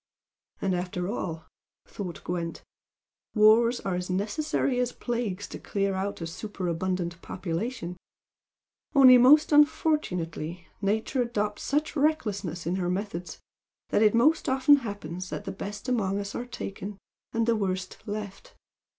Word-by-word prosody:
"And 190 -1 +1
after 180 0 -2
all," 165 -7 -4 0.4
thought 180 -4 -7
Gwent 170 -1 -4 0.7
"wars 225 +3 +5
are 195 - -2
as 180 +1 -3
necessary 245 +7 0
as 250 -1 +1
plagues 220 -5 -3
to - - -7
clear 195 -1 -1
out 190 0 -3
a - - -2
superabundant 175 -1 -3
population, 180 +1 -4 1.0
only 255 -2 +9
most 290 +6 +6
unfortunately 180 - +1 0.2
Nature 220 +6 0
adopts 210 -3 -1
such 300 +3 -1
recklessness 205 - 0
in 175 +3 0
her 175 -2 -1
methods 180 -2 -4 0.5
that - - +2
it 215 0 +5
most 300 +7 +3
often 270 +2 +6
happens 185 - -6
the 205 -1 -5
best 205 +4 -7
among 205 -6 +1
us 200 0 -4
are 245 - -4
taken, 200 -4 -6 0.3
and 230 0 +1
the 230 0 +3
worst 190 -3 -2
left. 205 -1 -6
205 Hz, 135 wpm, -27 LUFS, 180-240 Hz, 1.0 s, only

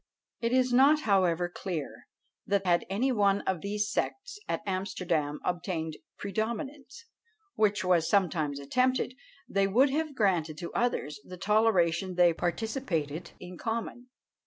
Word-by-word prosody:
It 230 0 -1
is 255 -1 +2
not, 285 +5 +6
however, 180 - +2
clear 175 -4 -6 0.4
that 200 -1 +1
had 175 -1 +2
any 235 +8 +1
one 200 -4 +3
of 185 -4 -2
these 205 +1 -1
sects 415 - -3
at - - -1
Amsterdam 180 -6 -1
obtained 170 -3 -2 0.2
predominance, 265 - -4 0.5
which 210 -2 +2
was 175 -3 +3
sometimes 160 -8 +1
attempted, 255 - +1 0.3
they 195 0 +2
would 255 +8 +4
have 305 0 -1
granted 175 -9 +1
to 170 - -6
others 150 -12 -1
the 180 +4 -10
toleration 190 -3 +2
they 175 -1 +5
participated 175 - -2
in 180 0 -10
common. 230 +2 -4
195 Hz, 135 wpm, -29 LUFS, 175-235 Hz, 0.5 s, not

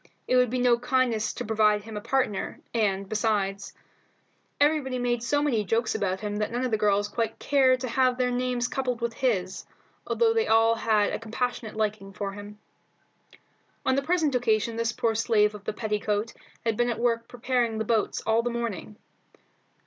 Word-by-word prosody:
It 255 - +2
would 250 -1 +4
be 255 - -2
no 245 -1 +3
kindness 245 -3 +1
to - - -5
provide 210 -1 +2
him 220 0 -9
a 210 - -4
partner, 250 -5 -1
and, 200 -4 0
besides, 200 -2 -1 0.9
everybody 285 -3 +2
made 240 -1 0
so 290 +5 +1
many 240 -8 +1
jokes 225 +3 0
about 190 -1 -1
him 210 -1 -3
that 210 +1 -2
none 245 +2 -1
of 250 - -2
the 220 - +2
girls 205 -1 +2
quite 225 +1 -2
cared 260 -3 +3
to 260 - -2
have 255 +1 +2
their 250 -1 +1
names 245 -1 0
coupled 250 -3 -2
with 235 -1 -2
his, 195 -7 -1 0.4
although 455 -1 +2
they 450 0 +1
all 225 +1 +4
had 220 -2 +1
a - - -2
compassionate 230 0 -3
liking 210 -2 -2
for 200 +1 -4
him. 205 +1 -10 1.3
On 260 - +3
the 275 - +2
present 315 -1 +1
occasion 230 -2 +1
this 230 0 0
poor 230 0 0
slave 215 -1 +2
of 205 -1 -11
the - - -1
petticoat 210 0 -2 0.3
had 225 -1 +1
been 240 +2 +1
at 235 - -2
work 230 -1 0
preparing 240 -2 -1
the 220 - -2
boats 225 -1 0
all 225 +1 +3
the 240 - -2
morning. 235 -4 -4
230 Hz, 185 wpm, -26 LUFS, 210-250 Hz, 1.3 s, would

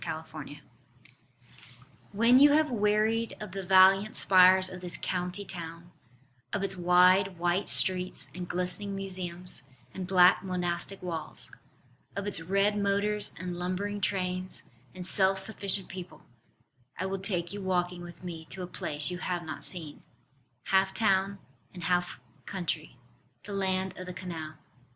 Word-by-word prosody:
OXFORD - - -6
CANAL - - -12 1.5
When 230 +5 +5
you 290 +1 +7
have 305 -1 +3
wearied 215 +1 +1
of 210 -3 -7
the 195 +1 -4
valiant 190 +2 +5
spires 185 0 +6
of 185 -1 -8
this 175 -2 -1
County 180 +2 -3
Town, 170 -1 -8 0.6
Of 200 - -2
its 195 -1 -2
wide 180 +1 +4
white 175 +3 0
streets 185 -6 +2
and 180 +1 -6
glistening 180 +3 -2
museums, 180 -4 -4 0.3
and 185 -2 -5
black 180 0 +5
monastic 180 +1 -3
walls, 165 -3 -5 0.6
Of 200 - -3
its 200 -5 -2
red 200 +4 +1
motors 205 +1 +1
and 180 -1 -5
lumbering 200 +3 -3
trains, 185 -1 -2 0.3
and 180 -1 -7
self 190 +1 +3
sufficient 195 -1 +2
people, 180 -1 -9 0.7
I - - -2
will 195 0 -3
take 180 -2 -2
you 205 - -5
walking 180 -1 -1
with 175 +1 -11
me 165 -3 -7
to 185 +3 -7
a - - -5
place 150 -2 +1
you 180 - -5
have 175 -1 -2
not 155 -1 -7
seen 160 -5 -6 0.7
Half 190 0 +3
town 195 -2 +2 0.4
and 175 - -8
half 175 -3 0 0.3
country 165 -8 -4 0.5
the 205 - -7
land 190 -1 -1
of 185 - -7
the 180 - -7
Canal. 160 -4 -6
185 Hz, 145 wpm, -29 LUFS, 180-195 Hz, 1.5 s, you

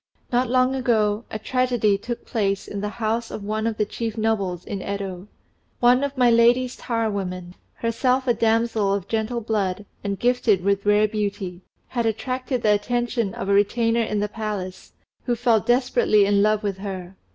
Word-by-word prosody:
Not 245 0 +1
long 255 +1 +3
ago 225 -4 +1
a - - -4
tragedy 245 -2 +1
took 235 +4 -6
place 200 -4 -1
in 200 - -5
the 210 - -2
house 225 +1 -2
of 210 - -6
one 215 +2 -1
of 225 -1 -2
the 210 - +1
chief 225 +1 -4
nobles 200 -5 -1
in 200 - -4
Yedo. 195 -1 -5 0.5
One 250 +2 +4
of 280 -1 -3
My 245 -2 +5
Lady's 240 +2 +4
tire 230 -2 -1
women, 185 -3 -4 0.2
herself 250 +3 0
a 245 - +3
damsel 225 -3 +1
of 200 -1 -5
gentle 225 +2 -1
blood, 205 -3 -1 0.2
and 200 -1 -2
gifted 235 -6 +2
with 200 +1 0
rare 210 +1 +4
beauty, 200 -4 -3 0.3
had 235 -2 -1
attracted 255 +3 -2
the 210 - +5
attention 235 0 -1
of - - -5
a 200 - +2
retainer 230 +3 +2
in 215 -2 -1
the 210 - 0
palace, 210 -4 -5 0.3
who 245 - +1
fell 235 -1 +3
desperately 240 -3 +3
in 200 0 +3
love 215 +1 +2
with 195 -2 -2
her. 190 -2 -6
220 Hz, 180 wpm, -23 LUFS, 200-240 Hz, 0.5 s, My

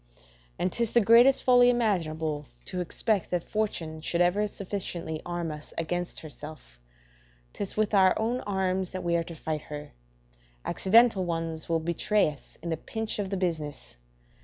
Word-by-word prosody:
And 180 - -1
'tis 235 -2 -1
the 235 - +6
greatest 240 +5 +6
folly 245 -1 +6
imaginable 160 - 0 0.2
to 180 -1 -2
expect 195 +2 0
that 175 -2 -1
fortune 165 -7 -3
should 170 +2 -1
ever 185 +4 +3
sufficiently 180 -6 -4
arm 175 -2 -2
us 150 0 -9
against 175 +2 -2
herself; 150 - -10 0.7
'tis 200 - -4
with 215 -1 +1
our 190 -2 +5
own 235 +3 0
arms 190 -2 -1
that 185 - -4
we 170 0 +1
are 170 - +1
to 165 0 -9
fight 155 -1 -3
her; 150 0 -7 0.7
accidental 220 0 +4
ones 165 -2 -3
will 165 -1 +2
betray 170 +2 +1
us 145 - -16
in 170 - -3
the 160 - 0
pinch 220 +6 -3
of 200 -2 -2
the 195 - -2
business. 150 - -3
175 Hz, 160 wpm, -28 LUFS, 160-210 Hz, 0.7 s, the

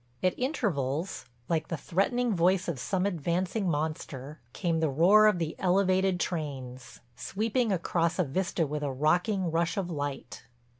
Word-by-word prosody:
At 185 - +3
intervals, 180 - -2 0.2
like 160 -2 0
the 165 - -3
threatening 225 - 0
voice 180 +2 +2
of 165 -7 -3
some 180 +11 -1
advancing 180 +3 -1
monster, 150 -2 -4
came 170 0 -1
the 160 -1 +1
roar 190 +10 +6
of 210 -4 +3
the 165 -2 -3
elevated 185 0 +2
trains, 135 -8 -5
sweeping 225 - -1
across 170 -2 0
a 180 - +3
vista 170 +3 -1
with 150 +1 -3
a 145 -2 -1
rocking 175 +6 +1
rush 165 +2 0
of 180 -3 -2
light. 145 -5 -5
170 Hz, 150 wpm, -29 LUFS, 150-190 Hz, 0.2 s, roar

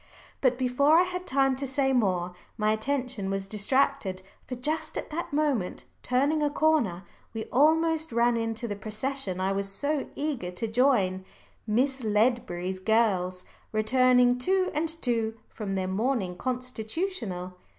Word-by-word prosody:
But 255 -2 +3
before 265 +5 +3
I 350 - +6
had 365 0 -5
time 270 0 +2
to 275 0 -3
say 270 0 +1
more, 185 -7 +1 0.2
my 215 -1 +2
attention 240 -3 -2
was 195 0 -2
distracted. 210 -2 +1 0.2
For 250 - -4
just 300 +6 -2
at - - -5
that 335 +2 -4
moment, 285 -10 0 0.2
turning 280 +5 +1
a 295 - +2
corner, 290 - +1 0.3
we 220 - -2
almost 320 +3 +3
ran 235 +1 +3
into 225 0 -2
the 205 - -3
procession 215 -1 -3
I 190 +1 0
was 195 0 -2
so 285 +7 -1
eager 280 -11 -2
to 180 +6 -3
join 220 -6 +2 0.4
Miss 260 +4 +1
Ledbury's 210 -5 0
girls, 185 -4 +1 0.3
returning 245 +2 +4
two 375 +6 +1
and 315 +2 0
two 235 -8 -1
from 200 -3 -4
their 190 -1 -1
morning 200 -1 -1
constitutional. 245 - -3
245 Hz, 145 wpm, -27 LUFS, 200-280 Hz, 0.4 s, I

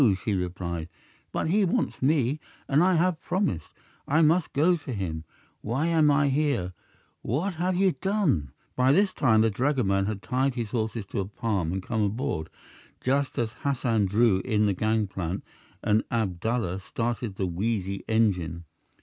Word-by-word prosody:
she 100 +3 -2
replied; 90 -3 -3 0.4
"but - - -1
he 205 +4 +3
wants 180 - 0
me, 140 0 +2 0.3
and 140 +3 +3
I 185 +1 +4
have 170 0 +1
promised; 175 - -1 0.4
I 160 +4 +4
must 160 +2 +3
go 165 +6 +3
to 145 -5 -7
him. 80 -6 -4 0.4
Why 125 +8 -1
am 160 -3 +4
I 145 0 +3
here? 135 -11 0 0.5
What 160 - -1
have 185 +1 +1
you 190 +1 +3
done?" 180 - 0 0.2
By 130 +2 +4
this 195 +3 +3
time 110 -5 +3
the 110 0 +3
dragoman 100 -5 +1
had 105 -2 -4
tied 130 0 0
his 115 -4 -3
horses 110 -2 -2
to - - -2
a 95 - -1
palm 100 -4 -2
and 95 0 -3
come 110 0 -1
aboard, 100 -7 -1 0.5
just 135 +2 0
as 115 -2 0
Hassan 120 -7 +1
drew 105 0 +3
in 105 0 +1
the 100 - +2
gangplank 95 -3 -1 0.4
and 105 +1 +3
Abdallah 110 -2 -1
started 115 +1 -3
the 95 - -1
wheezy 100 +1 -2
engine. 90 -7 +1
115 Hz, 160 wpm, -27 LUFS, 95-145 Hz, 0.5 s, I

